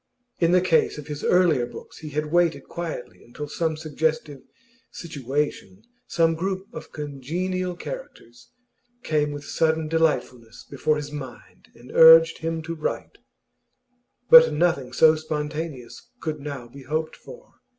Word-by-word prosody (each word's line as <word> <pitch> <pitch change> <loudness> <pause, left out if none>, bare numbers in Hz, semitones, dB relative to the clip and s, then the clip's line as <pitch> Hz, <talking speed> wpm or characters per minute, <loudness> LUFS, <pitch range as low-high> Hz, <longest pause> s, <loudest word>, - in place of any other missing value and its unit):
In 170 -1 +3
the 180 0 +5
case 170 -4 +2
of 150 - -8
his 145 0 -7
earlier 165 -9 +3
books - - -12
he 155 - -8
had 150 +1 -3
waited 175 -1 +2
quietly 170 -7 -7
until 145 +5 -8
some 160 +1 -2
suggestive 155 -2 -2 0.5
'situation,' 155 - -4 0.2
some 165 -1 +2
group 190 +3 -3
of 155 - -9
congenial 175 +6 -4
characters, 175 - -10 0.5
came 150 -1 0
with 145 0 -7
sudden 160 -1 0
delightfulness 150 -8 -1
before 145 +2 0
his 150 -1 -5
mind 135 -4 -10
and 120 +2 -14
urged 165 0 +7
him 165 0 -3
to 165 +1 -5
write; 155 -2 -5 1.1
but 245 -4 +9
nothing 150 -5 0
so 155 +5 +5
spontaneous 155 - -5
could 155 -2 -4
now 140 -4 -7
be 135 +4 -13
hoped 155 +4 -3
for. - - -14
155 Hz, 140 wpm, -24 LUFS, 145-165 Hz, 1.1 s, but